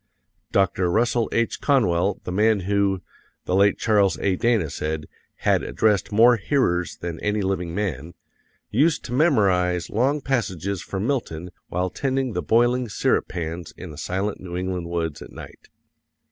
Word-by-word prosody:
Dr. 95 -2 +2
Russell 115 +3 +1
H. 115 0 0
Conwell, 100 - +2
the - - -5
man 105 +2 +3
who, 100 0 0 0.4
the - - -2
late 100 +1 +4
Charles 100 -5 +2
A. 95 -2 0
Dana 110 -7 +1
said, 75 +1 -3 0.4
had - - +4
addressed 105 -3 +1
more 115 +3 +6
hearers 95 -8 0
than 85 -1 -5
any 105 0 -1
living 90 -3 -2
man, 85 -6 -3 0.6
used 150 +8 +2
to 120 - -5
memorize 95 - +2
long 135 +7 +1
passages 100 - -2
from 95 +1 -4
Milton 90 - -2 0.2
while 90 +1 -2
tending 135 -1 -1
the 90 - -1
boiling 120 +6 +2
syrup - - +1
pans 85 -1 -5
in 90 -3 -8
the 75 - -11
silent 95 +3 -2
New 90 -1 -6
England 90 -2 -3
woods 80 -3 -3
at - - -10
night. - - -12
100 Hz, 155 wpm, -23 LUFS, 90-115 Hz, 0.6 s, more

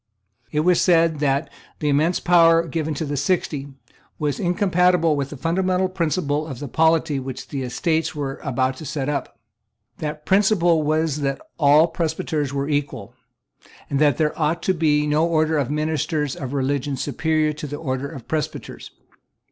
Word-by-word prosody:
It 150 - +1
was 180 +2 +3
said 165 -3 +3
that 140 0 +1 0.3
the 150 - -3
immense 155 +5 +2
power 165 -1 +5
given 155 0 -2
to 155 - -3
the 145 0 -3
Sixty 145 -1 -1 0.5
was 145 -2 -2
incompatible 180 -3 +2
with 140 -1 -2
the 145 - -8
fundamental 185 +4 0
principle 155 -4 -1
of 135 - -6
the 145 - -6
polity 160 0 +2
which 130 -1 -7
the 140 - -4
Estates 160 +6 -1
were 140 -2 -4
about 130 -1 -1
to - - -9
set 145 -1 -3
up. 140 -4 -3 0.6
That 150 0 -5
principle 190 -5 +3
was 155 0 0
that 140 -2 -2 0.2
all 150 +1 +6
presbyters 160 -3 -2
were 140 0 -2
equal, 145 -1 -3 0.8
and 140 - +1
that 150 -1 +3
there 155 -2 +1
ought 160 +3 0
to 190 - +2
be 150 -3 +2
no 150 +1 +2
order 155 -2 +1
of 135 -3 -1
ministers 150 -1 -1
of 130 -2 -6
religion 140 0 -1
superior 155 +2 0
to 150 0 -7
the 145 +1 -5
order 135 -2 -3
of 135 -7 -10
presbyters. 155 -1 -4
150 Hz, 165 wpm, -22 LUFS, 140-165 Hz, 0.8 s, all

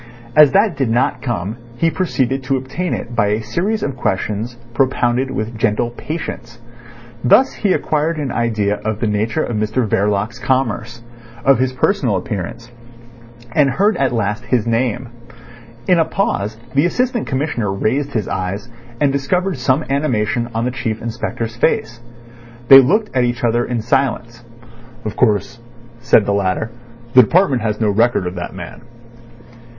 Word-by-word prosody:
As 150 -2 +8
that 200 -3 +3
did 135 -4 0
not 120 +3 +1
come 110 -3 -3 0.2
he 165 +5 +2
proceeded 135 -6 -1
to 135 0 +1
obtain 140 +8 -3
it 120 - -7
by 105 -2 +2
a 105 +2 0
series 205 - -1
of 140 -2 -2
questions 110 +1 -2 0.2
propounded 130 0 +1
with 115 -2 -4
gentle 110 +1 0
patience. 120 -4 -6 0.6
Thus 255 - +5
he 205 - 0
acquired 155 -1 0
an 145 -4 -3
idea 105 -3 0
of 110 0 -2
the 115 - -1
nature 105 +2 0
of 120 - -3
Mr 110 +3 0
Verloc's 105 +4 0
commerce, 120 -3 -1 0.4
of 135 -3 +5
his 130 0 0
personal 130 - +1
appearance, 105 +5 -5 0.8
and 140 +3 +3
heard 205 +10 +2
at 135 -2 +1
last 115 0 -2
his 120 -4 +1
name. 120 +1 -1 0.8
In 180 -2 +4
a 165 - +4
pause 110 - -1 0.2
the 140 +5 +3
Assistant 245 +4 -1
Commissioner 130 -7 -1
raised 130 +9 -1
his 110 -4 -1
eyes, 95 +5 -3 0.3
and 145 -2 +3
discovered 175 +5 -1
some 130 +4 +1
animation 120 -4 0
on 115 +1 0
the 125 - 0
Chief 115 -3 -3
Inspector's 115 0 -4
face. 120 0 0 0.7
They 135 - +12
looked 205 - +2
at 125 - +3
each 120 0 -1
other 120 0 +2
in 120 -2 -2
silence. 120 -1 -1 0.6
"Of 110 - -4
course," 110 -1 +1 0.4
said 120 -3 +4
the 100 - +1
latter, 100 +3 -1 0.4
"the 125 - +9
department 140 - +3
has 105 -1 -2
no 110 -2 +2
record 115 -1 +2
of 90 - -3
that 90 0 -6
man." 85 -2 -9
120 Hz, 160 wpm, -18 LUFS, 110-135 Hz, 0.8 s, They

